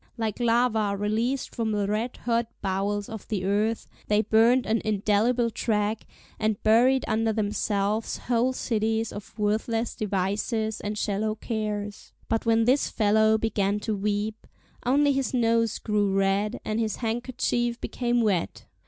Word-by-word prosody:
Like 220 -1 -2
lava 230 -4 +2
released 225 +6 -1
from 225 -2 -1
the 205 -1 0
red 215 +5 -2
hot 235 -1 +1 0.2
bowels 200 +1 -1
of 220 -2 -8
the 195 -4 -2
earth, 210 +3 0 0.2
they 210 +1 +3
burnt 230 +4 +4
an 225 0 +1
indelible 215 +3 +1
track, 215 -1 -1 0.3
and 215 -1 +1
buried 245 +5 +4
under 225 0 +1
themselves 210 0 -1
whole 245 +1 +1
cities 225 -2 -1
of 205 - -10
worthless 220 +2 0
devices 215 +2 -1
and 210 +1 -4
shallow 215 +1 -1
cares. 210 -2 -4 0.2
But 225 +1 -1
when 225 0 +4
this 260 +4 +3
fellow 220 0 +3
began 210 -2 0
to 215 0 -1
weep, 210 +2 -2 0.4
only 285 +3 +4
his 270 -1 -1
nose 230 -2 +2
grew 210 -2 0
red, 195 +3 +1
and 215 +1 -1
his 220 -3 -1
handkerchief 240 0 -1
became 240 -1 -1
wet. 195 - -1
220 Hz, 145 wpm, -26 LUFS, 205-230 Hz, 0.4 s, burnt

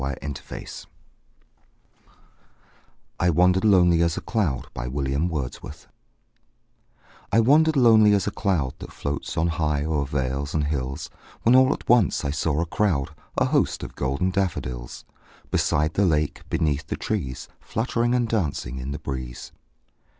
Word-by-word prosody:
William 70 +1 -4 0.2
Wordsworth - - -8 2.3
I 85 - +3
Wandered 90 +3 +3
Lonely 90 -5 +5
As 85 0 +1
a - - -3
Cloud 90 - -1
I - - -4 2.5
WANDERED 155 +7 +5
lonely 110 -5 +6
as 100 - 0
a 105 - -1
cloud 85 - -1
That - - -9
floats 70 +3 -4
on 80 - +2
high 75 -4 0
o'er 75 -3 0
vales 70 +2 -2
and 75 - +1
hills, 70 -2 -3 0.3
When 115 - +5
all 130 +1 +6
at - - -4
once 120 -10 +3
I 70 - 0
saw 75 +1 0
a - - 0
crowd, 85 -6 0 0.3
A - - +3
host, - - +1
of - - -7
golden 70 +8 -1
daffodils; 65 -11 -3 0.5
Beside 75 +2 +1
the 100 - +2
lake, 75 -3 -1
beneath 75 -1 0
the - - -3
trees, 65 -2 -3
Fluttering 120 +2 -1
and 120 -2 +1
dancing 75 - -2
in 65 +1 -5
the - - -4
breeze. 65 -2 -6
80 Hz, 140 wpm, -24 LUFS, 70-100 Hz, 2.5 s, lonely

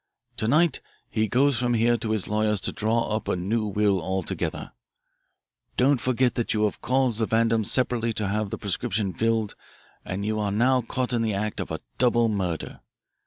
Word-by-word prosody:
To 110 - -1
night 155 +6 +3 0.3
he 110 0 +1
goes 130 +2 +2
from 120 -1 +1
here 115 +1 +3
to 115 -1 -4
his 110 -3 +1
lawyer's 105 -1 +1
to - - +1
draw 110 0 0
up 110 - -4
a - - +1
new 105 +5 -1
will 100 -2 +1
altogether. 95 0 -3 1.1
Don't 135 0 +3
forget 125 0 +1
that 120 -2 -1
you 105 - +1
have 105 - -1
caused 130 -3 +1
the 110 - +1
Vandams 115 -1 +2
separately 120 -3 +2
to 105 -2 -2
have 105 +1 -1
the - - -4
prescription 100 -1 -2
filled, 115 -2 0 0.5
and 95 +2 -4
that - - -3
you 110 0 -1
are 105 -1 -1
now 125 +5 +3
caught 125 +2 -2
in 120 - +1
the 110 -3 0
act 105 +2 -3
of - - -4
a 80 0 -4 0.2
double 120 -2 +3
murder. 95 -6 -3
110 Hz, 195 wpm, -25 LUFS, 105-120 Hz, 1.1 s, night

